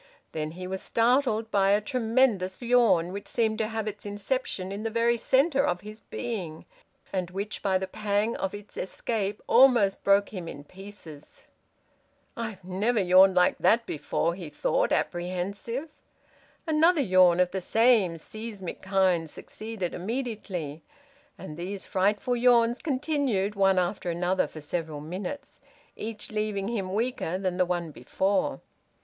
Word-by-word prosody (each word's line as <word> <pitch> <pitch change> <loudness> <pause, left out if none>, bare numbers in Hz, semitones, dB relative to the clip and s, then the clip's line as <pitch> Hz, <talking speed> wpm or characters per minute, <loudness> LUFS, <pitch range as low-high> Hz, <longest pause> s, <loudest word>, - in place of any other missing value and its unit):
Then 155 0 -4
he 185 +1 -7
was 190 +1 -4
startled 230 -2 +1
by 195 -1 +3
a 205 +1 +4
tremendous 225 -5 +1
yawn, 215 -8 +3
which 200 - -6
seemed 220 -2 0
to 220 - 0
have 220 -1 -3
its 210 0 -5
inception 205 -2 -3
in 200 +1 -5
the 225 - -2
very 230 +1 +2
centre 275 +5 +2
of 175 -5 0
his 215 +2 -10
being, 190 -10 -5 0.5
and 185 -2 -1
which 200 +3 -5
by 190 -2 +2
the 190 - -3
pang 210 +3 -1
of 190 +1 -3
its 205 0 -11
escape 205 +1 -3
almost 235 -6 +5
broke 200 0 +4
him 180 -5 -7
in 145 -3 -8
pieces. 180 -4 -13 0.9
"I've 220 -5 -5
never 205 +6 0
yawned 185 0 +6
like 180 0 +3
that 225 +6 +3
before," 160 +2 -1
he 175 -3 -8
thought, 145 - 0
apprehensive. 195 - -2 0.8
Another 320 +1 +4
yawn 185 -6 +5
of 180 0 +3
the 190 - -3
same 220 -4 +3
seismic 210 +1 -7
kind 185 -4 +1
succeeded 215 +1 -6
immediately, 190 - -4 0.6
and 150 - -9
these 190 +3 -5
frightful 205 +6 +1
yawns 240 0 +3
continued 265 -8 0
one 195 -2 +3
after 180 0 -1
another 180 +2 0
for 155 - -10
several 155 0 -4
minutes, 185 - -7 0.3
each 220 -1 -7
leaving 210 -2 -2
him 195 -6 -3
weaker 215 -4 -1
than 185 -2 -2
the 180 -1 +2
one 175 -2 -2
before. 190 - -1
200 Hz, 145 wpm, -27 LUFS, 180-230 Hz, 0.9 s, yawned